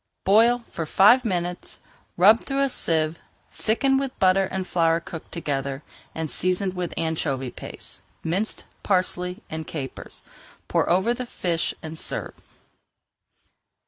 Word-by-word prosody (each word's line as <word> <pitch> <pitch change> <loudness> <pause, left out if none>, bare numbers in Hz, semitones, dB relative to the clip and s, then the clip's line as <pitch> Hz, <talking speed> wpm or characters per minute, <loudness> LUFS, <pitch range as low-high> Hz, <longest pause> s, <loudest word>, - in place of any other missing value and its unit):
Boil 230 +5 +5
for 165 -2 -4
five 210 +10 +6
minutes, 180 -4 -2 0.4
rub 210 +6 +7
through 275 0 -1
a 275 - +2
sieve, 160 -7 0 0.3
thicken 270 +5 +2
with 270 -2 -4
butter 190 +1 +4
and 190 0 -3
flour 165 -2 +2
cooked 165 -1 -9
together, 140 -3 -3 0.4
season 185 +4 0
with 180 -2 -3
anchovy 140 -6 -1
paste, - - -7 0.2
minced 190 +7 -1 0.2
parsley, 180 -1 0
and 160 0 -6
capers. 135 -5 -6 0.4
Pour - - +1
over 190 +7 +3
the 250 0 -5
fish 170 -7 -1
and 160 0 -5
serve. - - -2
180 Hz, 125 wpm, -24 LUFS, 160-210 Hz, 0.4 s, rub